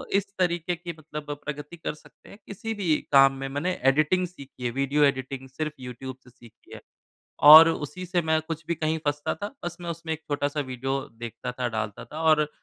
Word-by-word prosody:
इस 200 - +2
तरीके 175 -1 0
की 170 0 -7
मतलब 150 -1 -7
प्रगति 150 +3 -6
कर 160 - -4
सकते 150 - -19
हैं, 200 - -12
किसी 225 +3 -5
भी 180 -7 +1 0.2
काम 135 -1 +7
में। 135 0 -5
मैंने 145 +7 -1 0.2
एडिटिंग 165 +6 +2
सीखी 140 -7 -13
है, 120 - 0
वीडियो 140 +3 +1
एडिटिंग 130 -1 0
सिर्फ़ 155 +3 -4
यूट्यूब 130 +1 -7
से 125 - -17
सीखी 120 -2 -18
है - - -9 0.7
और 160 +2 +12
उसी 160 +3 -4
से 175 -1 0
मैं 160 0 +2
कुछ 165 -1 -4
भी 170 - 0
कहीं 160 0 -1
फँसता 145 0 0
था, 205 - -6
बस 175 - -4
मैं 170 -1 -4
उसमें 165 -1 -4
एक 160 0 -5
छोटा-सा 145 +1 -1
वीडियो 135 +1 -2 0.2
देखता 120 +1 -6
था, 125 -1 -2
डालता 110 -2 -4
था 155 +2 -7
और 155 -2 +4
150 Hz, 205 wpm, -26 LUFS, 135-165 Hz, 0.7 s, और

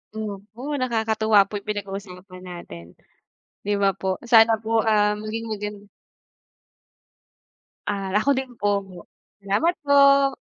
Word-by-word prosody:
Opo, 215 +1 -7 0.2
nakakatuwa 220 -3 +2
po 205 0 -5
'yung - - -25
pinag-uusapan 195 -2 -7
natin. 85 - -9 0.8
Di 205 - 0
ba, 195 - +4
po? 190 -1 -3
Sana 225 -1 +5
po, 225 0 0
ah, 210 -1 +2
maging 215 +2 -5
magan 205 -1 -6 2.0
Ah, 195 -2 -2
ako 245 +6 +1
din 260 -1 -3
po, 205 -1 +1 0.6
salamat 205 - 0
po. 280 -1 +5
210 Hz, 115 wpm, -23 LUFS, 200-225 Hz, 2.0 s, Sana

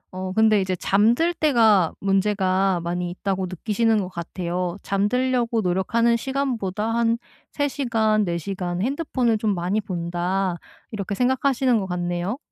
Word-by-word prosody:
어 185 0 -4
근데 215 0 +4
이제 185 -1 -1
잠들 230 - +2
때가 225 - +3
문제가 195 -1 +1
많이 175 +1 -2
있다고 190 +1 -2
느끼시는 215 +5 0
것 185 -2 -3
같아요. 175 +1 -4
잠들려고 235 +3 +1
노력하는 220 +6 +1
시간보다 235 -6 -2
'한 230 0 +2 0.3
3 285 -1 0
시간, 225 -6 +1
4 170 -3 -1
시간 180 0 -4
핸드폰을 255 -4 0
좀 210 -2 0
많이 185 +5 -1
본다.' 180 0 -2 0.3
이렇게 200 -2 -4
생각하시는 255 0 +2
것 190 - -4
같네요. 175 +5 -2
200 Hz, 300 characters per minute, -23 LUFS, 185-235 Hz, 0.3 s, 근데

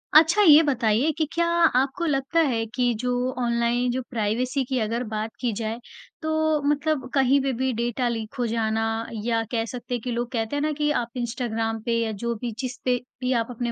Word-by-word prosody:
अच्छा, 325 +7 +7
ये 320 -4 +8
बताइए 250 0 +2
कि 315 - +2
क्या 340 0 +2
आपको 330 -1 +2
लगता 280 +2 +1
है 225 -4 0
कि 245 -2 +2
जो 250 +1 -1 0.3
ऑनलाइन 235 +1 +1
जो 260 +1 -2
प्राइवेसी 245 +4 0
की 260 -2 0
अगर 230 +2 -1
बात 215 +1 -2
की 245 -3 0
जाए, 220 +2 -3 0.4
तो 315 -1 +1
मतलब 295 -1 0
कहीं 270 0 +4
पे 270 -1 0
भी 260 0 +1
डेटा 240 +2 -1
लीक 225 -2 -4
हो 245 - +1
जाना 225 -1 0 0.4
या 230 -1 +1
कह 225 -2 0
सकते 245 +2 -6
हैं 240 - -4
कि 245 - -4
लोग 240 +1 -2
कहते 225 +1 -2
हैं 290 - 0
ना 305 - +1
कि 295 0 0
आप 235 +2 -8
इंस्टाग्राम 225 -2 -2
पे 235 -1 +1
या 220 - -2
जो 235 0 0
भी 240 -2 -2
जिसपे 255 -1 -1 0.2
भी 255 0 0
आप 230 - -5
अपने 240 0 -3
245 Hz, 205 wpm, -25 LUFS, 230-275 Hz, 0.4 s, ये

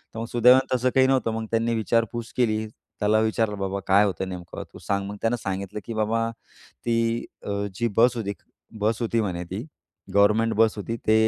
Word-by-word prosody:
तर 115 - -4
मग 115 - -3
सुदैवानं 125 +2 +5
तसं 130 +1 +2
काही 130 0 +6
नव्हतं. 130 -4 +2
मग 110 0 -3
त्यांनी 115 +1 +1
विचारपूस 115 +1 0
केली. 110 -3 +1 0.3
त्याला 105 +1 +3
विचारलं, 110 -1 +1
"बाबा 95 0 -2
काय 100 +2 +6
होतं 95 -1 -2
नेमकं 90 -2 -7
तू - - -11
सांग." 100 0 -1
मग 105 - -6
त्यानं 115 +2 +1
सांगितलं, 100 +1 -3
की 115 - -5
"बाबा 115 +1 0 0.6
ती 115 - +2 0.5
अ, - - -4 0.2
जी 120 +4 0
बस 120 +2 +5
होती. 100 -3 -2 0.5
बस 110 +2 +1
होती" 115 0 +1
म्हणे 90 -4 -2
"ती. 95 +6 -5 0.5
गव्हर्नमेंट 105 +3 +4
बस 110 -1 +4
होती. 115 +3 -4
ते 110 - +6
110 Hz, 190 wpm, -25 LUFS, 100-115 Hz, 0.6 s, काही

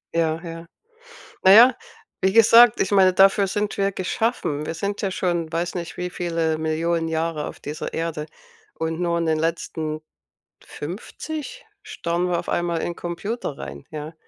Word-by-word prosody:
Ja, 160 -1 +1
ja. 165 0 -8 0.8
Na 190 - +7
ja, 240 +3 +8 0.4
wie 190 0 +1
gesagt, 230 +1 +7
ich 190 - 0
meine, 190 -2 +5
dafür 195 +1 +5
sind 205 +2 -2
wir 195 0 +1
geschaffen. 185 -6 -1
Wir - - -3
sind 200 +4 -3
ja 195 - 0
schon, 175 -3 -1
weiß 170 +2 -2
nicht, 170 -2 -5
wie 180 0 -3
viele 165 -3 -1
Millionen 165 +1 -1
Jahre 160 -1 -2
auf - - -9
dieser 150 +1 -6
Erde, 160 -2 -3 0.5
und 160 +1 -3
nur 170 -1 0
in 170 - 0
den 155 -1 +1
letzten 160 -1 -3 0.6
50 305 - -7 0.2
starren 170 +1 -2
wir 175 -1 0
auf - - -6
einmal 170 -1 -1
in 175 - -3
Computer 175 - -5
rein, 70 +1 -8
ja. 155 +1 -6
170 Hz, 165 wpm, -23 LUFS, 160-195 Hz, 0.8 s, ja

